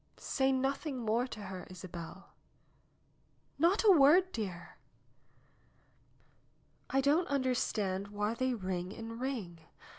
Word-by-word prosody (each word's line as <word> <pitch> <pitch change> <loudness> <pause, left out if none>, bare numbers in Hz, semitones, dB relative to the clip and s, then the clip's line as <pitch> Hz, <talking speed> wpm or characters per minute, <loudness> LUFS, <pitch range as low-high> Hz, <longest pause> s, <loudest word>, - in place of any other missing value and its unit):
"Say 265 0 0
nothing 270 +2 -1
more 235 +1 0
to 220 -4 -8
her, 185 -2 -7
Isabel." 180 0 -9 1.3
"Not 350 +8 +3
a 425 - +7
word, 350 +4 +6
dear." 190 - -6 2.1
"I 270 - +2
don't 300 +6 +3
understand 220 -8 0
why 205 +2 -2
they 255 +1 0
ring 185 -3 -3
and 230 +1 -7
ring. 220 -11 -4
235 Hz, 110 wpm, -33 LUFS, 190-275 Hz, 2.1 s, a